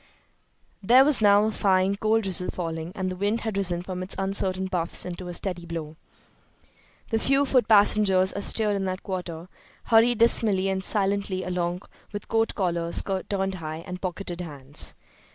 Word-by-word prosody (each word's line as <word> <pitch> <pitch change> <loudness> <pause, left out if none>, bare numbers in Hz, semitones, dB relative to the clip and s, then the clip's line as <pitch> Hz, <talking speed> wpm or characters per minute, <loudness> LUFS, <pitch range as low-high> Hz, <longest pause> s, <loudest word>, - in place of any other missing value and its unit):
There 250 +7 +5
was 290 -5 +6
now 205 0 +5
a 220 - 0
fine, 190 -2 +1
cold 220 +2 +1
drizzle 185 -2 0
falling, 165 -1 -5
and 185 -2 -3
the - - -5
wind 205 +5 -1
had 220 -3 -4
risen 180 -3 -1
from 185 0 -6
its 185 - -4
uncertain 190 -1 -1
puffs 175 -3 -2
into 180 0 -7
a 175 - -6
steady 175 -2 -4
blow. 160 -2 -6 1.2
The 225 - +1
few 275 +4 +2
foot 255 -2 +2
passengers 200 -3 +4
astir 210 +1 0
in 200 -1 -2
that 185 0 -4
quarter 175 -3 -6 0.4
hurried 235 +1 +3
dismally 210 -4 +4
and 190 0 -2
silently 200 -2 0
along 180 0 -3 0.3
with 205 - -6
coat 225 0 0
collars 170 -3 0 0.3
turned 195 -1 -1
high 160 -2 -7
and 180 -1 -7
pocketed 180 -1 -5
hands. 145 -4 -6
190 Hz, 165 wpm, -25 LUFS, 180-205 Hz, 1.2 s, was